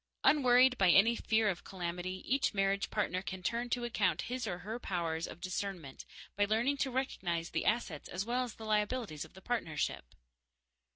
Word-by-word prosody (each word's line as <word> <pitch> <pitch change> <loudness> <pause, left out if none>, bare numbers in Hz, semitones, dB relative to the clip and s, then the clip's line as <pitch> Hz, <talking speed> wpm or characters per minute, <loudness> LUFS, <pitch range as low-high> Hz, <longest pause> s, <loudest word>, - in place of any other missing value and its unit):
Unworried 255 -2 +5
by 190 -2 +5
any 210 +7 +6
fear 220 -1 +2
of 185 -4 -1
calamity, 180 0 -4
each 265 -4 +1
marriage 195 0 +1
partner 185 +1 -1
can 185 -1 -6
turn 235 +5 -1
to 245 0 -1
account 215 -6 +1
his 250 -1 -3
or 175 - -2
her 215 +7 -5
powers 170 -5 -2
of - - -10
discernment 185 -6 -4 0.3
by 205 - +2
learning 230 +7 +1
to 275 - 0
recognize 180 -10 -2
the - - -1
assets 210 -9 -1
as 185 +3 -3
well 245 +2 0
as 240 -3 -6
the 220 - -9
liabilities 210 - -1
of - - -18
the 190 - -13
partnership. 155 - -2
200 Hz, 180 wpm, -33 LUFS, 180-240 Hz, 0.3 s, any